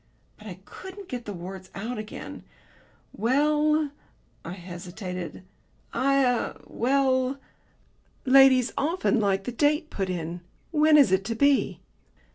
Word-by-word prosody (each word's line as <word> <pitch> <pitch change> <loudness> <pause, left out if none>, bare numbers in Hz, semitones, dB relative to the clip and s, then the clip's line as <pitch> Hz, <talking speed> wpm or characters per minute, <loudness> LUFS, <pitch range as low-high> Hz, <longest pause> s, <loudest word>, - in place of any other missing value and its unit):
But 215 - -13
I 185 -3 -7
couldn't 380 0 -10
get 245 -3 -5
the 210 - -5
words 185 +1 -8
out 220 +5 -4
again. 215 0 -8 0.7
"Well," 300 +5 +2 0.5
I 170 - -6
hesitated, 180 0 -7 0.5
"I 275 0 +3
er 245 -1 0
well." 260 +1 +1 0.9
"Ladies 265 -1 +6
often 325 -4 +1
like 195 -2 +1
the 245 - -4
date 300 +5 +1
put 190 -2 -2
in. 170 -1 -4 0.3
When 305 -1 +5
is 275 -10 +6
it 190 0 +2
to 230 +1 -2
be?" 280 +3 +2
245 Hz, 125 wpm, -26 LUFS, 190-285 Hz, 0.9 s, Ladies